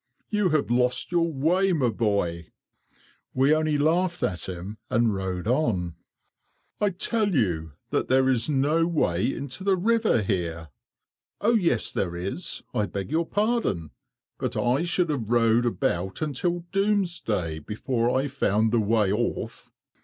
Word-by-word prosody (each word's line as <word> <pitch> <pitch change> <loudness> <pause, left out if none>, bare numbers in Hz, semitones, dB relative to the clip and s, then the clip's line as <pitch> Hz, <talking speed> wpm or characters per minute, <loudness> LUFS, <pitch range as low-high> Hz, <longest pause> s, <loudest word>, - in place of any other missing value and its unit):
You 210 -3 +1
have 155 -6 +1
lost 125 +3 +1
your 170 -1 +2
way, 180 +7 +2
my 135 -7 +2
boy." 100 -7 -1 0.9
We 135 +3 +4
only 155 -1 +1
laughed 170 +4 +1
at 90 +1 -2
him 95 +4 -7
and 115 -1 +2
rowed 95 -1 -3
on. 110 - 0 0.9
"I 210 - +2
tell 200 +1 -1
you 80 - 0 0.2
that - - 0
there 130 0 +3
is 125 0 +1
no 150 +4 +2
way 135 - +1
into 140 +6 -6
the 195 -1 +2
river 220 - +2
here. 85 -5 -2 0.7
Oh, 230 +3 +2
yes, 170 - +1
there 85 -3 -2
is; 95 - -4
I 105 -4 0
beg 100 +6 -5
your 165 +1 +1
pardon, 210 - 0 0.5
but - - -2
I 125 +4 +2
should 175 -1 +1
have 120 -7 -3
rowed 120 0 +3
about 95 -3 -1
until 170 +4 -2
doomsday 175 - 0
before 115 - -1
I 130 +2 +1
found 110 -6 +1
the 120 - +3
way 105 -2 +2
off." 120 +3 -3
125 Hz, 145 wpm, -26 LUFS, 100-170 Hz, 0.9 s, We